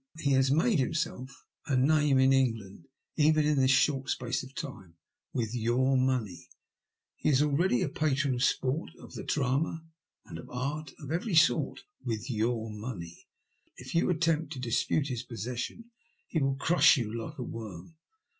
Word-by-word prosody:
He 140 -3 0
has 135 0 +3
made 165 - +3
himself 130 -1 -3 0.2
a 135 -4 +1
name 145 +1 +3
in 130 +1 +5
England, 115 -5 -1 0.3
even 155 0 +4
in 150 -1 +2
this 130 0 +3
short 135 0 +2
space 125 -2 -1
of 130 0 -12
time 90 -11 -7 0.2
— - - -63
with 115 -2 -2
your 125 +3 +1
money. 130 -8 -1 0.7
He - - 0
is 145 0 +4
already 150 -2 +2
a - - 0
patron 140 -2 0
of 125 0 -1
sport, 135 +4 0
of - - -13
the - - -6
drama, 150 +4 -1 0.4
and 80 - -8
of - - -11
art 140 +4 -4
of 145 -1 -8
every 175 +4 -1
sort 155 - +3
— - - -39
^with 115 +2 -3
your 115 0 -1
money. 105 -6 -8 0.5
If 125 +1 -9
you 170 - +2
attempt 165 -2 +1
to 130 - -7
dispute 125 +4 0
his 125 -3 -3
possession, 125 - -6 0.3
he 160 - -1
will 135 0 +1
crush 160 +2 +5
you 110 -4 -3
like 115 +7 -6
a 125 - -4
worm. 110 - -8
130 Hz, 175 wpm, -29 LUFS, 120-150 Hz, 0.7 s, in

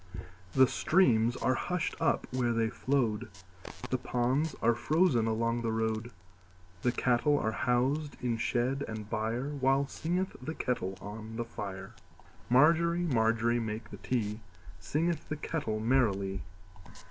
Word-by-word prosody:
The 130 - +7
streams 120 -9 +3
are 130 - +1
hushed 175 +7 -2
up - - +2
where 120 -2 +1
they 115 -1 +1
flowed, 125 -5 0 0.6
The 130 - +1
ponds 130 +6 0
are 120 +1 +3
frozen 145 -2 +2
along 115 +1 0
the 115 -1 -1
road, 110 +1 -1 0.7
The 125 - +2
cattle 125 +4 +2
are 110 - 0
housed 130 +6 0
in 120 -2 -1
shed 125 +4 0
and 110 -1 -6
byreWhile 135 +5 0
singeth 180 +6 -2
the 160 - -5
kettle 95 -7 -2
on 110 +2 -7
the 120 0 -2
fire. 95 -4 -7 0.6
Margery, 170 +6 +4
Margery, 115 -4 +2
make 110 -1 -5
the - - -7
tea, 105 -4 -2 0.4
Singeth 160 - -1
the 150 - -2
kettle 140 -8 -2
merrily. 100 -6 +1
120 Hz, 135 wpm, -31 LUFS, 110-140 Hz, 0.7 s, The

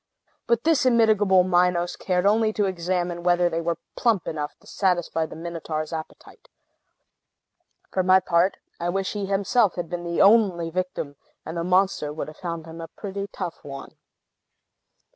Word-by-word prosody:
But 235 -1 +2
this 320 -3 +3
immitigable 215 -6 +4
Minos 180 -1 +2
cared 180 0 -1
only 215 +2 +3
to 210 - +1
examine 175 -1 -2
whether 175 0 +3
they 165 +1 -1
were 170 -1 -1 0.2
plump 225 -7 +1
enough 150 -2 -4
to - - -24
satisfy 175 -4 0
the - - -10
Minotaur's 160 -1 -5
appetite. 160 - -9 1.4
For 190 - +1
my 185 +1 +5
part, 180 +1 +1 0.2
I 170 +1 -1
wish 190 +1 -1
he 205 -2 -3
himself 200 +2 +2
had 175 -2 -4
been 175 -1 -3
the 170 0 -2
only 195 -6 +4
victim; 180 -5 -3 0.3
and 160 - -6
the 170 - -2
monster 185 -4 +1
would 155 0 -5
have 155 - -13
found 170 -3 -5
him 165 0 -9
a 165 - -6
pretty 200 +3 -6
tough 180 -4 -5
one. 135 -1 -9
180 Hz, 160 wpm, -24 LUFS, 170-195 Hz, 1.4 s, my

